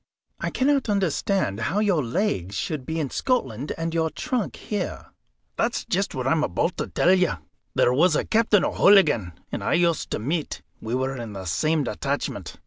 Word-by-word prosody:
"I -, -, -2 dB
cannot 275 Hz, -2 st, +1 dB
understand 190 Hz, -, 0 dB
how 175 Hz, -, -2 dB
that 210 Hz, -, +2 dB
your 175 Hz, -8 st, +2 dB
legs 115 Hz, -, -1 dB
should 145 Hz, +1 st, -3 dB
be 160 Hz, +1 st, -2 dB
in 145 Hz, -4 st, -2 dB
Scotland 140 Hz, -, -1 dB
and 165 Hz, 0 st, -3 dB
your 160 Hz, -1 st, +1 dB
trunk 245 Hz, -, -3 dB
here." 205 Hz, -4 st, -5 dB, 0.5 s
"That's -, -, 0 dB
just 195 Hz, -2 st, -1 dB
what 130 Hz, -1 st, -3 dB
I'm 155 Hz, +3 st, +2 dB
aboot 170 Hz, -, 0 dB
to -, -, -2 dB
tell 180 Hz, -, +3 dB
you. 185 Hz, -2 st, +3 dB, 0.4 s
There 125 Hz, -, +4 dB
was 155 Hz, +5 st, +4 dB
a -, -, 0 dB
Captain 220 Hz, -3 st, +3 dB
O'Hooligan 150 Hz, -, +4 dB, 0.2 s
and -, -, -4 dB
I -, -, +1 dB
used 170 Hz, -2 st, +2 dB
to -, -, -1 dB
meet; 150 Hz, +8 st, -3 dB, 0.2 s
we 115 Hz, +2 st, -2 dB
were 130 Hz, +1 st, -1 dB
in 115 Hz, -4 st, -6 dB
the 95 Hz, -1 st, -7 dB
same 155 Hz, -, +1 dB
detachment. 125 Hz, -, -3 dB
160 Hz, 185 wpm, -24 LUFS, 130-195 Hz, 0.5 s, There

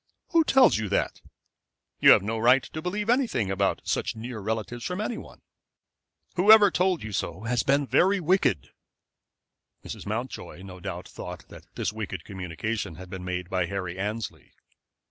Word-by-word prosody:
"Who 335 Hz, -2 st, +4 dB
tells 265 Hz, -, +5 dB
you 110 Hz, -2 st, -3 dB
that? 100 Hz, -, -1 dB, 0.8 s
You -, -, +7 dB
have -, -, +8 dB
no 110 Hz, +2 st, -2 dB
right 125 Hz, +4 st, +5 dB
to 155 Hz, -, -7 dB
believe 205 Hz, +5 st, -3 dB
anything 230 Hz, -, +1 dB
about 95 Hz, 0 st, 0 dB
such -, -, -1 dB
near 115 Hz, +1 st, -6 dB
relatives 110 Hz, +3 st, -4 dB
from 180 Hz, +1 st, -3 dB
any 215 Hz, +2 st, -2 dB
one. -, -, -14 dB, 0.9 s
Whoever 205 Hz, +2 st, +7 dB
told 180 Hz, +1 st, +1 dB
you 110 Hz, -, -6 dB
so 90 Hz, -1 st, -3 dB
has 115 Hz, 0 st, +1 dB
been 140 Hz, +1 st, +2 dB
very 180 Hz, -, +3 dB
wicked." 170 Hz, -, +1 dB, 1.1 s
Mrs. -, -, -7 dB
Mountjoy 95 Hz, -, -5 dB
no 95 Hz, -1 st, -10 dB
doubt 90 Hz, -1 st, -6 dB
thought 90 Hz, -2 st, -9 dB
that -, -, -13 dB
this -, -, -2 dB
wicked 95 Hz, -6 st, -5 dB
communication 95 Hz, +1 st, -4 dB
had 90 Hz, +1 st, -11 dB
been 95 Hz, -2 st, -6 dB
made 90 Hz, -1 st, -3 dB
by 90 Hz, -1 st, -1 dB
Harry 95 Hz, -1 st, -4 dB
Annesley. 105 Hz, +2 st, -5 dB
110 Hz, 165 wpm, -26 LUFS, -, 1.1 s, have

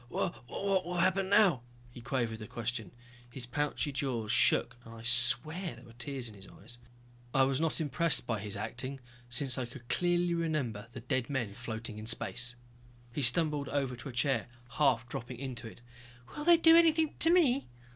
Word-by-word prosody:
"What... 145 Hz, -7 st, -3 dB
what 195 Hz, -2 st, 0 dB
will 180 Hz, +1 st, -5 dB
happen 190 Hz, +2 st, +2 dB
now?" 200 Hz, -, +5 dB, 0.3 s
He 120 Hz, -, -11 dB
quavered 115 Hz, -3 st, -2 dB
the 105 Hz, -, -8 dB
question. 120 Hz, -4 st, -4 dB, 0.4 s
His 125 Hz, 0 st, -5 dB
pouchy 145 Hz, +3 st, -2 dB
jaws 130 Hz, -6 st, -2 dB
shook 120 Hz, +1 st, +3 dB
and 115 Hz, 0 st, -11 dB
I 115 Hz, -, -11 dB
swear 125 Hz, +8 st, +1 dB
there 120 Hz, -, -15 dB
were 115 Hz, -, -15 dB
tears 125 Hz, +1 st, -4 dB
in 110 Hz, -, -9 dB
his 100 Hz, -1 st, -13 dB
eyes. 120 Hz, +5 st, -12 dB, 0.6 s
I 135 Hz, -, +6 dB
was 135 Hz, +2 st, +1 dB
not 165 Hz, 0 st, 0 dB
impressed 155 Hz, -1 st, +2 dB
by 115 Hz, -3 st, -2 dB
his 100 Hz, 0 st, -4 dB
acting 130 Hz, +6 st, -3 dB, 0.3 s
since 130 Hz, +1 st, +1 dB
I 125 Hz, -, -3 dB
could 120 Hz, 0 st, -13 dB
clearly 175 Hz, 0 st, +1 dB
remember 145 Hz, -11 st, -2 dB
the 120 Hz, -, -8 dB
dead 125 Hz, +1 st, -1 dB
men 120 Hz, -8 st, -2 dB
floating 110 Hz, -1 st, -6 dB
in 110 Hz, -, -7 dB
space. 120 Hz, +1 st, +1 dB, 0.6 s
He 145 Hz, -, -2 dB
stumbled 145 Hz, +2 st, +2 dB
over 135 Hz, -3 st, -1 dB
to 125 Hz, +3 st, -7 dB
a -, -, -6 dB
chair, 120 Hz, -1 st, 0 dB, 0.2 s
half 125 Hz, -3 st, +2 dB
dropping 120 Hz, +1 st, -6 dB
into 125 Hz, -3 st, -6 dB
it. 115 Hz, -, -13 dB, 0.5 s
"Will 295 Hz, -, -5 dB
they 345 Hz, 0 st, +7 dB
do 330 Hz, 0 st, +7 dB
anything 320 Hz, -2 st, +4 dB
to 325 Hz, -, +6 dB
me?" 290 Hz, -7 st, +3 dB
130 Hz, 185 wpm, -31 LUFS, 120-160 Hz, 0.6 s, they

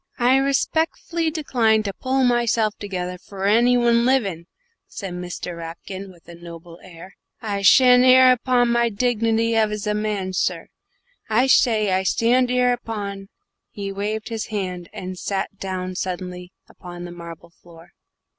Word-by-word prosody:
"I 250 Hz, +2 st, +3 dB
respeckfully 320 Hz, +4 st, 0 dB
decline 235 Hz, -8 st, +1 dB
to 200 Hz, -2 st, -4 dB
pull 265 Hz, +3 st, -1 dB
myshelf 235 Hz, -3 st, +2 dB
togerrer 180 Hz, -3 st, -5 dB
f'r 195 Hz, -1 st, -4 dB
anybody 240 Hz, +2 st, +4 dB
livin'," 230 Hz, -9 st, 0 dB, 0.4 s
said 195 Hz, -3 st, -7 dB
Mr. 180 Hz, 0 st, -6 dB
Rapkin, 180 Hz, +4 st, -8 dB
with 170 Hz, -2 st, -21 dB
a 170 Hz, -, -11 dB
noble 170 Hz, 0 st, -12 dB
air. 180 Hz, +1 st, -13 dB, 0.2 s
"I 205 Hz, -3 st, -3 dB
shtan' 250 Hz, +4 st, +6 dB
'ere 255 Hz, 0 st, +7 dB
upon 250 Hz, -1 st, +2 dB
my 235 Hz, 0 st, +2 dB
dignity 230 Hz, 0 st, 0 dB
as 215 Hz, -1 st, 0 dB
a 210 Hz, -, 0 dB
man, 210 Hz, -3 st, -2 dB
sir. -, -, -2 dB, 0.6 s
I 225 Hz, +4 st, +3 dB
shay, 220 Hz, -6 st, +3 dB
I 185 Hz, 0 st, +2 dB
shtand 240 Hz, +6 st, +2 dB
'ere 250 Hz, 0 st, +2 dB
upon 200 Hz, -5 st, -6 dB, 0.2 s
" -, -, -59 dB
Here 205 Hz, -, -7 dB
he 195 Hz, -, -3 dB
waved 210 Hz, +3 st, -4 dB
his 225 Hz, -1 st, -4 dB
hand, 185 Hz, -5 st, -5 dB
and 185 Hz, 0 st, -7 dB
sat 200 Hz, 0 st, -3 dB
down 185 Hz, -1 st, -4 dB
suddenly 180 Hz, -1 st, -5 dB, 0.2 s
upon 175 Hz, 0 st, -10 dB
the 175 Hz, -, -8 dB
marble 170 Hz, -1 st, -11 dB
floor. 170 Hz, 0 st, -18 dB
210 Hz, 155 wpm, -22 LUFS, 185-240 Hz, 0.6 s, ere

